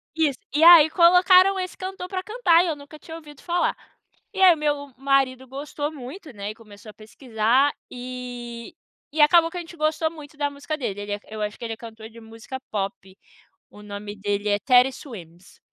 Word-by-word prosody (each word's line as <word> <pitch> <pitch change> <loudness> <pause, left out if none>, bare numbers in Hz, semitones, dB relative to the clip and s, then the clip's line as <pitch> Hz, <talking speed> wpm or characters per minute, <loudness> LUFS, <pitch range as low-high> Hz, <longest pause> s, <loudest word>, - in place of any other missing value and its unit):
Isso. 305 -5 0 0.2
E 305 - +3
aí 335 -2 +9
colocaram 365 +3 +5
esse 370 -1 -5
cantor 375 -1 -6
pra 370 -1 -4
cantar, 380 -7 +3
e - - -2
eu 320 - -1
nunca 290 +1 -13
tinha 320 - -10
ouvido 295 -3 -13
falar. 350 0 0 0.6
E 385 - -3
aí 365 -3 +7
meu 290 -2 -3
marido 265 -1 0
gostou 290 +3 -5
muito, 300 +4 -10
né, 205 0 -6
e - - -12
começou 215 -1 -15
a - - -26
pesquisar, 230 +4 0 0.2
e 245 -2 -8 0.4
e 310 - +1
acabou 330 +2 +5
que 355 - -8
a - - -3
gente 340 0 -13
gostou 315 +1 0
muito 300 -2 -13
da 290 -1 0
música 285 +2 -6
dele, 205 -8 -4
ele 205 0 -4
é 205 - -4
eu 215 0 -7
acho 210 0 -4
que - - -11
ele 225 - -4
é - - -9
cantor 220 -1 -11
de 230 0 -14
música 225 +4 -9
pop, 195 -2 -5 0.5
o 210 - -15
nome 205 0 -8
dele 205 +1 -2
é 205 0 +2
Teddy 250 +2 +4
Swims. 185 - -13
275 Hz, 200 wpm, -23 LUFS, 220-320 Hz, 0.6 s, aí